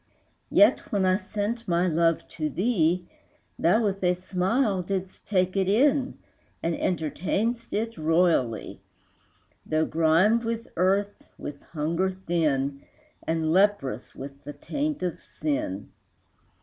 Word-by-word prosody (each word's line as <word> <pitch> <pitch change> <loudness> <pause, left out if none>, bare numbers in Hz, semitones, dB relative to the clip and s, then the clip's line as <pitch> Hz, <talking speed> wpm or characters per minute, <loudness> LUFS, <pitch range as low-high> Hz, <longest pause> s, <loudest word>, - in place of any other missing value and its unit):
Yet, - - +4
when 200 -3 +2
I 185 0 +4
sent 210 +4 -4
my 175 0 +2
love 165 0 +1
to 155 -2 -3
thee, 180 - +1 0.5
Thou 215 +8 +3
with 195 -2 -1
a 180 0 +3
smile 190 +4 0
didst 190 +1 -5
take 185 -2 +1
it 190 -1 +1
in, 265 +5 +2 0.5
And 165 - +1
entertain'dst 185 +9 -1
it 225 -3 -2
royally, 160 - +1 0.8
Though 155 0 +1
grimed 165 +9 +3
with 230 0 -3
earth, 195 +3 +1 0.2
with 140 -1 -7
hunger 165 +4 -1
thin, 155 -7 -1 0.5
And 160 -1 0
leprous 185 - +1
with 140 +1 -9
the 145 +1 -7
taint 290 - -3
of 180 -3 -3
sin. 140 -10 -3
180 Hz, 125 wpm, -26 LUFS, 160-205 Hz, 0.8 s, Yet